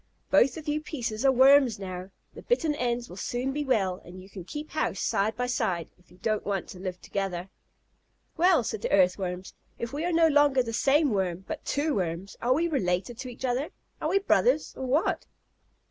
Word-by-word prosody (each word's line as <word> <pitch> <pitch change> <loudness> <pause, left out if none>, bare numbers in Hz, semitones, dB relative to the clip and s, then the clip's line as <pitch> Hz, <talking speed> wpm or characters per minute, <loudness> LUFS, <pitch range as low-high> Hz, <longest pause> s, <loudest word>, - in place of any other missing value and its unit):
Both 255 +3 +4
of 315 -1 -9
you 300 +1 0
pieces 235 -8 -4
are 270 - +7
Worms 265 -2 +6
now. 185 -1 -6 0.2
The - - -10
bitten 330 -11 +1
ends 245 -3 -1
will 180 - -11
soon 250 +6 -2
be 295 +1 -1
well, 200 -9 0
and 180 +2 -11
you 190 +2 -14
can 185 -2 -8
keep 295 - -7
house 310 - -1
side 210 +2 0
by 250 - 0
side, 180 -9 -1
if 180 - -27
you 180 - -19
don't 215 +3 -1
want 195 -3 -2
to 180 - -9
live 185 -1 -5
together." 190 -2 -4 0.8
"Well," 345 -5 +4
said 220 -1 -4
the - - -2
Earthworms, 185 -1 +1 0.2
"if 235 +2 -5
we 295 +3 -2
are 350 - 0
no 330 -1 +5
longer 290 -4 +4
the 230 -1 -5
same 285 +4 +3
Worm, 190 -2 -1
but 315 -2 -5
two 295 +1 0
Worms, 180 -1 -3
are 250 +2 +3
we 335 +3 +1
related 220 - -1
to 260 -1 -5
each 245 +2 -6
other? 255 +4 -1 0.3
Are 310 - 0
we 385 - +3
brothers, 395 -1 +2
or 260 - -4
what?" 300 +10 +1
245 Hz, 205 wpm, -27 LUFS, 190-290 Hz, 0.8 s, are